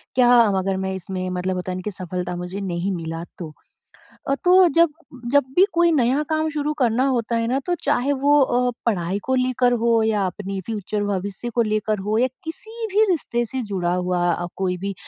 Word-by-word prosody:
क्या 250 -1 +5 0.3
अगर 190 0 -1
मैं 190 0 -2
इसमें 185 0 -4
मतलब 180 +1 -2
होता 180 0 -4
है - - -3
ना 185 - -5
कि 210 - -2
सफलता 180 -1 -5
मुझे 180 +2 -5
नहीं 185 0 -2
मिला 165 0 -5
तो? 170 -3 -6 0.8
अ, 275 - +3
तो 365 0 +6
जब, 335 +1 +4 0.4
जब 285 -1 +5
भी 370 - +7
कोई 340 0 +4
नया 270 0 +2
काम 315 0 0
शुरू 300 0 -1
करना 250 -1 +2
होता 235 -3 0
है 230 0 0
ना 255 +3 +1
तो 355 - +1
चाहे 285 -1 +1
वो 285 +2 +3
अ, 250 -1 +2 0.2
पढ़ाई 190 -3 0
को 260 - 0
लेकर 255 -1 +2
हो 230 -1 +3
या 215 -2 +1
अपनी 195 +1 -5
फ्यूचर 210 -1 -3
भविष्य 200 +3 -3
को 235 - +3
लेकर 215 -1 -1
हो 215 - +1
या 250 - +4 0.2
किसी 440 +8 -6
भी 425 +2 +5
रिश्ते 240 -8 0
से 260 +3 -4
जुड़ा 180 -2 0
हुआ 180 -1 0
अ, 175 +1 -3
कोई 185 -1 -1
भी 195 +2 -4
220 Hz, 205 wpm, -22 LUFS, 185-265 Hz, 0.8 s, भी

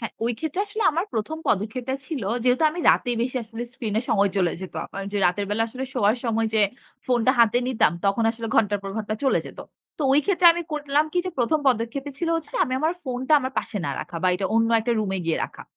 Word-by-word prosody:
হ্যাঁ, 230 - -5
ওই 240 - +1
ক্ষেত্রে 315 +5 -2
আসলে 425 +2 -3
আমার 335 +4 0
১ম 225 +9 -2
পদক্ষেপটা 235 +6 -1
ছিল, 295 -7 -4 0.2
যেহেতু 250 +3 +3
আমি 345 - -5
রাতে 245 - +1
বেশি 255 +2 -2
আসলে 225 +1 -7
স্ক্রিনে 220 -4 -2
সময় 200 -2 +3
চলে 180 -3 +2
যেত 190 - -8
আমার। 195 - -7
যে 205 - -1
রাতের 195 +3 0
বেলা 215 +2 +1
আসলে 260 +3 -5
শোয়ার 220 -1 +3
সময় 225 -1 +1
যে 220 - +4 0.5
ফোনটা 250 0 +3
হাতে 235 +1 +5
নিতাম, 255 -8 +2
তখন 200 +3 +2
আসলে 230 0 -6
ঘণ্টার 205 -2 +3
পর 195 - -5
ঘণ্টা 215 -1 -2
চলে 265 - +3
যেত। - - -12 0.4
তো 305 - -2
ওই 290 - +5
ক্ষেত্রে 365 -3 +4
আমি 345 - -3
করলাম 295 0 +1
কী 360 - +1
যে, - - -2
প্রথম 280 +6 +2
পদক্ষেপই 260 +4 -1
ছিল 340 - -1
হচ্ছে 325 -2 -7
আমি 255 - -5
আমার 315 +3 +2
ফোনটা 260 +1 -2
আমার 260 0 -3
পাশে 210 - -4
না - - -1
রাখা 170 - -7
বা - - +2
এটা 190 +1 -1
অন্য 225 0 +3
একটা 235 +2 0
রুমে 195 -2 -2
গিয়ে 165 - +1
রাখা। - - -10
240 Hz, 230 wpm, -24 LUFS, 215-280 Hz, 0.5 s, হাতে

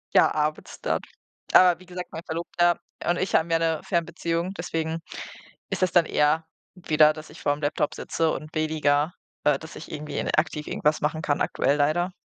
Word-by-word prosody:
Ja, - - +5
abends 150 0 -2
dann. - - 0 0.5
Aber 180 -2 +7
wie 185 - -15
gesagt, 180 0 -7
mein 160 - -6
Verlobter 175 +1 +1 0.3
und 175 +1 +1
ich 190 - -2
haben 165 +1 +3
ja 165 - +4
'ne 165 -1 0
Fernbeziehung, 170 0 -1
deswegen 165 -1 -2 0.7
ist - - -3
das 185 -2 +3
dann 175 -2 +5
eher 150 +2 +2 0.3
wieder, 155 -4 +4
dass 155 0 -11
ich 155 - -13
vor'm 145 +1 0
Laptop 145 0 0
sitze 165 -1 0
und 155 +1 -6
weniger, 155 0 +1 0.3
äh, 150 -2 +4
dass 160 -1 -10
ich - - -9
irgendwie 150 0 -5
in - - -1
aktiv 155 -1 0
irgendwas 150 +1 +1
machen 155 +2 -1
kann 145 -2 0
aktuell 140 +2 +1
leider. 155 +5 +2
160 Hz, 185 wpm, -25 LUFS, 150-170 Hz, 0.7 s, Aber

